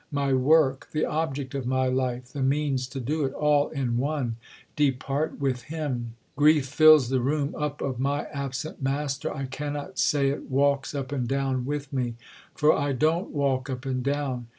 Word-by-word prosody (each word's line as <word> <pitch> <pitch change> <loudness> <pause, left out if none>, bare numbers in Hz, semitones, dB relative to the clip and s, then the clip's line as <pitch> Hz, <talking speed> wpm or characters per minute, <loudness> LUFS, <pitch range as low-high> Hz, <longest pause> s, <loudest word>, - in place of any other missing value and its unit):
My 140 -1 0
work, 135 0 +3
the 155 - +1
object 145 -4 -2
of 135 -3 -3
my 130 0 +1
life, 125 -1 -1
the 140 - -4
means 135 -1 +1
to 135 +1 -6
do 150 +5 -1
it, 135 0 -1
all 150 -1 +2
in 130 -5 -1
one, 135 -3 -1 0.4
depart 140 +1 0
with 130 -3 0
him. 130 -8 -4 0.2
"Grief 150 -1 +4
fills 150 -2 +6
the 130 -1 +1
room 145 +3 0
up 150 -1 -3
of 130 -3 -3
my 140 +2 0
absent" 140 +2 -4
master. 135 +1 -1
I 135 - -4
cannot 145 +6 -5
say 140 -2 +3
it 140 - -6
"walks 140 +1 +1
up 140 -1 -4
and 130 -4 -1
down" 135 -1 -1
with 145 0 -4
me. 125 -3 -1 0.4
For 150 0 +4
I 145 -1 0
don't 160 +7 +1
walk 135 -2 0
up 130 0 -5
and 130 -1 -1
down. 135 -3 -2
140 Hz, 180 wpm, -26 LUFS, 130-145 Hz, 0.4 s, fills